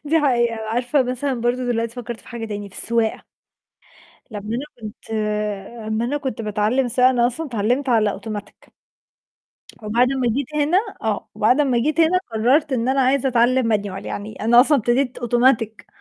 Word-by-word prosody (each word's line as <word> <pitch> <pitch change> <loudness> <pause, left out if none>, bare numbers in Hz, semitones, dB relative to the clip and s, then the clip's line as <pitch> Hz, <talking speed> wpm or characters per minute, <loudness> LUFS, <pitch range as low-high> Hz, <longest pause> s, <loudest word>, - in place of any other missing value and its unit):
دي 320 +2 +2
حقيقة، 240 -5 +2
عارفة 245 +4 +1
مثلًا 255 0 -2
برضه 245 +2 0
دلوقتي 230 -1 -1
فكّرت 240 -2 -6
في - - -17
حاجة 235 -2 -6
تاني 205 -2 -5
في 190 - -17
السواقة. 230 -2 0 1.0
لمّا 205 -2 -7
أنا 270 - -4 0.2
كنت 215 +1 -10 0.8
أمّا 220 +1 -1
أنا 265 +5 -1
كنت 265 -6 -4
باتعلّم 215 +5 0
سواقة 250 +2 +4
أنا 240 -2 +2
أصلًا 300 +7 -3
اتعلّمت 245 +3 -1
على 220 -4 +3
أوتوماتيك 210 0 -8 1.1
وبعد 235 +4 +2
ما 255 -3 0
جيت 285 +2 -3
هنا 300 +5 +3 0.2
آه 220 -2 -2
وبعد 245 +7 +3
أمّا 260 -5 +2
جيت 300 +6 +1
هنا 330 +3 +4
قرَّرت 265 +7 +2
إن 245 -1 0
أنا 270 +1 +2
عايزة 265 +1 +2
أتعلّم 245 -1 +2
manual 200 -2 -7
يعني 210 +2 -6
أنا 235 +3 +6
أصلًا 285 +3 +4
ابتديت 245 +2 0
أوتوماتيك 240 -2 +1
240 Hz, 170 wpm, -21 LUFS, 225-265 Hz, 1.1 s, أنا